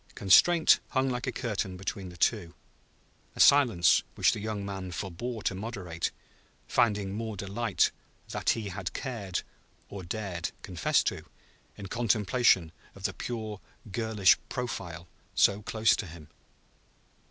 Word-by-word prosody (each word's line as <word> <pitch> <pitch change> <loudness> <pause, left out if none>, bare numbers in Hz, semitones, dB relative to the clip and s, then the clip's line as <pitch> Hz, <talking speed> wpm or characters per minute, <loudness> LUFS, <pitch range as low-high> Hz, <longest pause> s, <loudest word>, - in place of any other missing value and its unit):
Constraint 160 - +6
hung 130 -1 +1
like 125 +1 -3
a - - 0
curtain 105 -7 -3
between 95 0 -5
the 90 - -12
two; 85 -2 0 0.8
a - - -11
silence 115 - +6
which - - +4
the - - -3
young 105 -1 -4
man 95 -2 -5
forbore 100 +6 -5
to - - 0
moderate, 95 -5 -4 0.6
finding 105 -4 +1
more 110 0 -4
delight 100 +2 0 0.4
that - - -2
he 105 -3 -4
had 95 0 -5
cared 105 -9 -4 0.5
(or 100 - -7
dared) 90 -2 -4
confess 90 -5 +1
to, - - -2 0.5
in 100 - -8
contemplation 110 -4 +2 0.2
of - - -13
the - - 0
pure 110 -4 -5 0.3
girlish 110 -3 +4
profile 90 -9 -5 0.3
so 100 +1 +4
close 110 +1 +2
to 100 - -5
him. 80 -2 -12
100 Hz, 135 wpm, -29 LUFS, 95-115 Hz, 0.8 s, Constraint